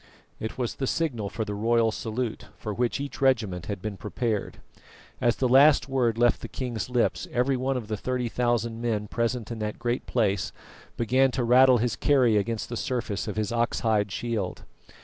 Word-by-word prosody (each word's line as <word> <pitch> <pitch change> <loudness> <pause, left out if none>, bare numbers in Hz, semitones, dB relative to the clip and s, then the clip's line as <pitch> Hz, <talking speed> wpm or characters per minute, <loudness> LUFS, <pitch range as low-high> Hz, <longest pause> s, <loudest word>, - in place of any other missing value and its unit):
It 110 - -5
was 125 -3 -2
the 135 - -2
signal 125 -12 -1
for 110 +2 -3
the 105 - -4
royal 115 +2 +2
salute, 110 +1 -4
for 105 - -4
which 120 +5 0
each 140 -1 -6
regiment 110 -10 +1
had 100 -3 -5
been 105 -2 -4
prepared. 110 +3 -3 0.6
As 120 -2 +3
the 130 - +1
last 135 0 +6
word 125 -4 +1
left 120 0 +3
the - - -5
king's 125 -3 -4
lips, 125 -1 0
every 125 +2 +1
one 130 +1 -1
of 115 -4 -5
the 110 -1 -2
thirty 125 +2 -2
thousand 120 -1 -1
men 110 -3 -1
present 115 +1 -2
in 115 - -5
that 105 0 -3
great 120 +1 -2
place 100 -6 0 0.5
began 130 +3 +3
to 130 - 0
rattle 125 +1 +6
his 120 0 0
kerry 130 -6 +3
against 110 +2 -1
the 120 - -5
surface 115 -5 -2
of 105 - -3
his 110 +2 -1
ox 120 0 0
hide 105 -3 +1
shield. 105 -3 -3
115 Hz, 190 wpm, -26 LUFS, 110-125 Hz, 0.6 s, last